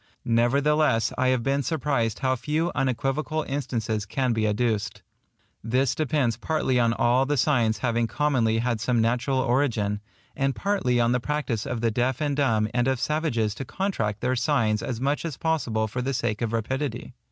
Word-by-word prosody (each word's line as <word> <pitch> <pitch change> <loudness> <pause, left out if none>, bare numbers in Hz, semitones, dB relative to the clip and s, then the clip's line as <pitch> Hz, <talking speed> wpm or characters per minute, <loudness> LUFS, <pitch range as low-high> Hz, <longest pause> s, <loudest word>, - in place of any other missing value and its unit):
Nevertheless 130 +1 +2
I 130 - +1
have 130 -2 +2
been 140 +2 +1
surprised 140 -6 -1
how 130 -1 +1
few 150 +7 -1
unequivocal 135 +4 -1
instances 115 -6 -3
can 130 +2 0
be 110 -1 +1
adduced. 105 0 -1 0.6
This 125 +3 +1
depends 140 -7 0
partly 130 -1 0
on 115 -1 +3
all 125 +3 +2
the 145 0 0
signs 120 -5 +2
having 120 -1 +1
commonly 120 -6 +1
had 115 -1 -1
some 120 0 +1
natural 125 +4 +1
origin; 120 -6 +1 0.3
and 135 0 0
partly 180 -12 0
on 120 0 +3
the 125 - +2
practice 140 -4 -2
of 120 -4 -3
the 115 -1 +1
deaf 125 +3 0
and 145 -2 0
dumb 115 -7 +2
and 120 +1 +1
of 130 -2 +1
savages 130 -10 0
to 135 - -6
contract 115 - -2
their 125 +1 +1
signs 120 -5 +1
as 120 -3 -4
much 140 +3 0
as 160 -5 -4
possible 120 -10 0
for 125 +4 -4
the 135 +1 -2
sake 120 -3 -1
of 115 -2 -1
rapidity. 120 +3 -3
125 Hz, 175 wpm, -25 LUFS, 115-140 Hz, 0.6 s, on